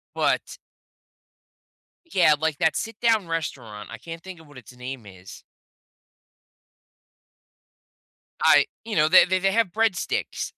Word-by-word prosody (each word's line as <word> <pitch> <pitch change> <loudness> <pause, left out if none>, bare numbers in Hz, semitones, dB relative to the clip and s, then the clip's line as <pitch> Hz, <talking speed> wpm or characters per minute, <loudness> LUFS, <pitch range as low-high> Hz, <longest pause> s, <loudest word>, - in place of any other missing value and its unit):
but - - -1 1.6
Yeah, 170 -5 +5
like, 155 -2 -1
that 160 -1 +1
sit 225 -1 -5
down 220 -6 +2
restaurant. 120 -10 -5
I 115 - -8
can't 165 +6 -9
think 185 -3 -10
of 160 - -17
what 145 -3 -15
its 125 +1 -14
name 125 -3 -8
is. 95 -1 -13 3.0
I - - +6 0.2
you 225 -4 -5
know, 155 0 +4
they 185 - +7
they 185 +1 0
they 195 +1 +1
have 225 -3 +2
breadsticks. 220 -6 -1
165 Hz, 130 wpm, -24 LUFS, 130-190 Hz, 3.0 s, they